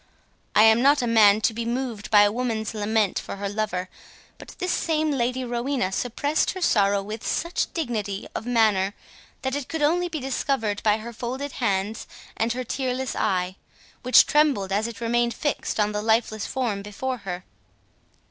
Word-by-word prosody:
I 215 Hz, -, +7 dB
am 220 Hz, +1 st, +6 dB
not 280 Hz, 0 st, +4 dB
a -, -, +1 dB
man 215 Hz, -2 st, +5 dB
to 220 Hz, -, +2 dB
be 230 Hz, +1 st, -3 dB
moved 235 Hz, -3 st, -3 dB
by 205 Hz, -2 st, +7 dB
a 205 Hz, -, +3 dB
woman's 225 Hz, -2 st, -2 dB
lament 210 Hz, -1 st, 0 dB
for -, -, -7 dB
her 200 Hz, 0 st, -4 dB
lover, 200 Hz, -3 st, -2 dB, 0.5 s
but -, -, -12 dB
this 365 Hz, -1 st, -2 dB
same 315 Hz, -1 st, 0 dB
Lady 255 Hz, -1 st, -1 dB
Rowena 240 Hz, -4 st, -1 dB
suppressed 270 Hz, +8 st, 0 dB
her -, -, -4 dB
sorrow 200 Hz, -, +3 dB
with 215 Hz, +2 st, -7 dB
such 340 Hz, +1 st, -1 dB
dignity 215 Hz, -, -3 dB
of 230 Hz, -, -5 dB
manner, 210 Hz, -5 st, +2 dB, 0.5 s
that 265 Hz, 0 st, -1 dB
it 285 Hz, -3 st, -4 dB
could 320 Hz, -2 st, -2 dB
only 350 Hz, +4 st, +2 dB
be 315 Hz, -2 st, -4 dB
discovered 250 Hz, -5 st, -1 dB
by 210 Hz, -1 st, +3 dB
her 235 Hz, +2 st, -8 dB
folded 260 Hz, +5 st, -4 dB
hands, 210 Hz, -3 st, -2 dB, 0.3 s
and 230 Hz, +1 st, 0 dB
her 255 Hz, +1 st, -3 dB
tearless 260 Hz, +1 st, -2 dB
eye, 185 Hz, 0 st, -1 dB, 0.4 s
which 255 Hz, 0 st, +6 dB
trembled 285 Hz, -11 st, +2 dB
as 210 Hz, +3 st, +1 dB
it 235 Hz, -1 st, -9 dB
remained 235 Hz, 0 st, +1 dB
fixed 290 Hz, -6 st, -2 dB
on 210 Hz, 0 st, +2 dB
the 210 Hz, 0 st, -2 dB
lifeless 220 Hz, -1 st, +1 dB
form 235 Hz, -7 st, -2 dB
before 250 Hz, +6 st, -4 dB
her." 180 Hz, -4 st, -6 dB
230 Hz, 175 wpm, -24 LUFS, 205-260 Hz, 0.5 s, I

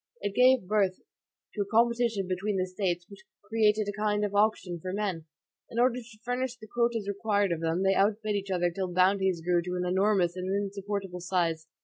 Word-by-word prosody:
It 205 Hz, -, -2 dB
gave 250 Hz, -5 st, +4 dB
birth 195 Hz, -3 st, +1 dB, 0.5 s
to 210 Hz, -, -2 dB
a -, -, 0 dB
competition 230 Hz, -2 st, +2 dB
between 190 Hz, +2 st, -1 dB
the 185 Hz, -, +1 dB
States 180 Hz, -2 st, -2 dB
which 200 Hz, -1 st, -13 dB, 0.2 s
created 215 Hz, 0 st, +2 dB
a 205 Hz, +1 st, -4 dB
kind 210 Hz, -1 st, +1 dB
of 205 Hz, -, -4 dB
auction 205 Hz, -4 st, +1 dB
for 185 Hz, +3 st, -5 dB
men. 190 Hz, -6 st, -3 dB, 0.4 s
In 230 Hz, -, -8 dB
order 250 Hz, +1 st, +3 dB
to 225 Hz, -3 st, -14 dB
furnish 250 Hz, 0 st, -2 dB
the 220 Hz, -, -12 dB
quotas 235 Hz, -1 st, -1 dB
required 200 Hz, -1 st, 0 dB
of 165 Hz, -1 st, -2 dB
them, 165 Hz, +3 st, 0 dB
they 195 Hz, 0 st, +4 dB
outbid 210 Hz, +2 st, +1 dB
each 200 Hz, -1 st, -3 dB
other 175 Hz, -2 st, +1 dB
till 185 Hz, +1 st, -3 dB
bounties 185 Hz, -1 st, +2 dB
grew 175 Hz, -1 st, +3 dB
to 180 Hz, +1 st, -4 dB
an 180 Hz, 0 st, -1 dB
enormous 185 Hz, -1 st, +2 dB
and 185 Hz, 0 st, -4 dB
insupportable 200 Hz, -1 st, -3 dB
size. 170 Hz, -3 st, -1 dB
200 Hz, 200 wpm, -28 LUFS, 185-215 Hz, 0.5 s, gave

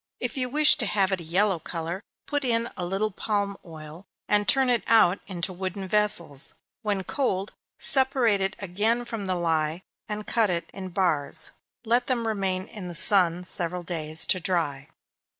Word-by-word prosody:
If 245 Hz, -2 st, -4 dB
you 255 Hz, -2 st, -3 dB
wish 300 Hz, +3 st, +7 dB
to 220 Hz, -, +2 dB
have 200 Hz, -2 st, +1 dB
it 190 Hz, -2 st, -1 dB
a -, -, -9 dB
yellow 185 Hz, +3 st, 0 dB
color, 170 Hz, +3 st, -6 dB, 0.2 s
put 290 Hz, -1 st, -2 dB
in 235 Hz, -2 st, 0 dB
a 180 Hz, -, -6 dB
little 195 Hz, +4 st, -2 dB
palm 200 Hz, 0 st, -3 dB
oil, 160 Hz, +2 st, -12 dB, 0.2 s
and 205 Hz, 0 st, +1 dB
turn 270 Hz, -1 st, +4 dB
it 245 Hz, -2 st, +2 dB
out 205 Hz, -4 st, +4 dB
into 185 Hz, -1 st, -3 dB
wooden 190 Hz, +1 st, -6 dB
vessels. 185 Hz, -9 st, +3 dB, 0.3 s
When 205 Hz, -4 st, -2 dB
cold, 195 Hz, -5 st, -3 dB, 0.2 s
separate 260 Hz, -6 st, +3 dB
it 190 Hz, +1 st, -1 dB
again 210 Hz, +6 st, -2 dB
from 225 Hz, -4 st, -6 dB
the 185 Hz, -, -1 dB
lye, 165 Hz, 0 st, -2 dB, 0.3 s
and 210 Hz, 0 st, -5 dB
cut, 225 Hz, -3 st, 0 dB
it 170 Hz, -1 st, -4 dB
in 190 Hz, -1 st, -8 dB
bars 170 Hz, -6 st, -1 dB, 0.3 s
let 240 Hz, +2 st, +1 dB
them 240 Hz, -3 st, -1 dB
remain 195 Hz, -4 st, -2 dB
in 200 Hz, -4 st, -10 dB
the 175 Hz, -, -7 dB
sun 180 Hz, -2 st, +6 dB
several 180 Hz, 0 st, -2 dB
days 160 Hz, -2 st, +2 dB
to 185 Hz, -, +1 dB
dry. 160 Hz, -7 st, -3 dB
195 Hz, 175 wpm, -25 LUFS, 175-220 Hz, 0.3 s, wish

